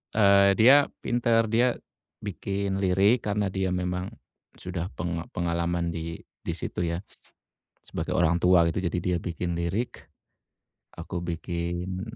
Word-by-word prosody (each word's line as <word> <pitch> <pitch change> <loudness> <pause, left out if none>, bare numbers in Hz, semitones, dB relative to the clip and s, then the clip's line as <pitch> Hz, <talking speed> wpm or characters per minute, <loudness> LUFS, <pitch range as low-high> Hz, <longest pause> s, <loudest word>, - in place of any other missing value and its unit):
eee, 100 -2 +6
dia 135 +5 +7 0.2
pintar, 115 -2 +2
dia, 120 +2 +3 0.5
bikin 100 -1 -2
lirik 100 +6 +3
karena 105 0 +1
dia 95 -1 -1
memang, 90 0 -2 0.5
sudah 90 -1 -4
penga 85 0 -3
pengalaman 85 0 -1
di 85 0 -5 0.2
di - - -2
situ 90 - -4
ya, 85 +1 -2 0.9
sebagai - - -3
orang 85 0 +3
tua 90 -1 +5
gitu, 85 - -1
jadi - - -3
dia 90 0 0
bikin 85 0 -3
lirik, 90 +8 -3 0.9
aku 85 +1 -5
bikin 85 +2 -3
90 Hz, 130 wpm, -27 LUFS, 85-100 Hz, 0.9 s, dia